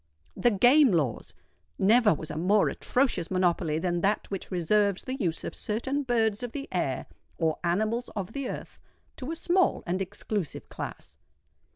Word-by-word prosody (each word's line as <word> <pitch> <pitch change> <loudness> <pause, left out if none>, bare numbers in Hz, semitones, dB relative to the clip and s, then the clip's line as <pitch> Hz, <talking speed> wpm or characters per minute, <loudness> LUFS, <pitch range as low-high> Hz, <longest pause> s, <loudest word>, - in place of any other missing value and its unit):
THE 240 - +3
GAME 245 +6 +5
LAWS! 140 -10 -1 0.5
Never 220 +2 +5
was 155 - -7
a - - -5
more 190 +6 +3
atrocious 250 -10 0
monopoly 175 -4 +1
than 175 0 -1
that 205 +2 0
which 195 - -4
reserves 200 +2 +1
the 260 - -4
use 180 - -2
of - - -4
certain 260 +7 -2
birds 225 -5 +1
of 245 -2 -5
the 280 -1 -5
air - - -1 0.3
or 160 -2 0
animals 215 +8 0
of 200 +1 -4
the 275 -2 -3
earth - - -7 0.4
to 260 - -6
a 325 - -2
small 360 +2 +2
and 180 +2 -1
exclusive 195 -2 -4
class. - - -8
205 Hz, 165 wpm, -28 LUFS, 175-245 Hz, 0.5 s, GAME